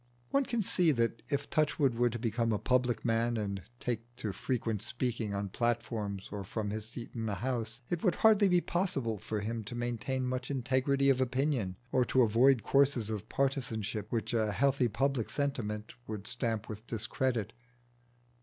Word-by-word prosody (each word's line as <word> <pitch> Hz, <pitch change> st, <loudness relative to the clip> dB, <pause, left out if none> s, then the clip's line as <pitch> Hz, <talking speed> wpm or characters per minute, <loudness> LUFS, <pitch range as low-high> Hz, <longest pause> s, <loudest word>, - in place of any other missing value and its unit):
One 275 Hz, 0 st, +3 dB
can 235 Hz, -3 st, 0 dB
see 180 Hz, -3 st, +4 dB
that 115 Hz, -2 st, 0 dB
if 145 Hz, -1 st, -1 dB
Touchwood 145 Hz, -3 st, +2 dB
were 120 Hz, +1 st, +2 dB
to 120 Hz, -, -4 dB
become 115 Hz, 0 st, 0 dB
a 105 Hz, -, +2 dB
public 125 Hz, +2 st, +1 dB
man 115 Hz, 0 st, +1 dB
and 100 Hz, -2 st, -2 dB, 0.2 s
take 120 Hz, 0 st, -4 dB
to 110 Hz, -4 st, -3 dB
frequent 115 Hz, -4 st, -1 dB
speaking 120 Hz, -3 st, -2 dB
on 100 Hz, 0 st, -2 dB
platforms 110 Hz, -3 st, -2 dB
or 100 Hz, -1 st, -4 dB
from 105 Hz, +2 st, -3 dB
his 110 Hz, +1 st, -4 dB
seat 115 Hz, 0 st, -7 dB
in 115 Hz, -2 st, -3 dB
the 105 Hz, -, -1 dB
House, 120 Hz, +2 st, -3 dB
it 175 Hz, -1 st, -2 dB
would 180 Hz, -5 st, +3 dB
hardly 215 Hz, -2 st, +5 dB
be 180 Hz, -1 st, +4 dB
possible 135 Hz, -, -1 dB
for 105 Hz, +2 st, -3 dB
him 115 Hz, +1 st, -3 dB
to 120 Hz, -, -6 dB
maintain 120 Hz, +2 st, -2 dB
much 125 Hz, 0 st, -2 dB
integrity 135 Hz, +1 st, +2 dB
of 130 Hz, -1 st, +1 dB
opinion, 130 Hz, -6 st, 0 dB, 0.2 s
or 130 Hz, -, +4 dB
to 130 Hz, 0 st, +4 dB
avoid 120 Hz, +3 st, +4 dB
courses 135 Hz, -6 st, +3 dB
of 110 Hz, 0 st, -5 dB
partisanship 115 Hz, -7 st, -1 dB
which 115 Hz, 0 st, -1 dB
a 110 Hz, -3 st, +1 dB
healthy 135 Hz, 0 st, +3 dB
public 130 Hz, 0 st, 0 dB
sentiment 110 Hz, -7 st, -2 dB
would 105 Hz, -2 st, -5 dB
stamp 110 Hz, -2 st, 0 dB
with 110 Hz, +1 st, -8 dB
discredit. 115 Hz, 0 st, -1 dB
120 Hz, 175 wpm, -32 LUFS, 110-130 Hz, 0.2 s, hardly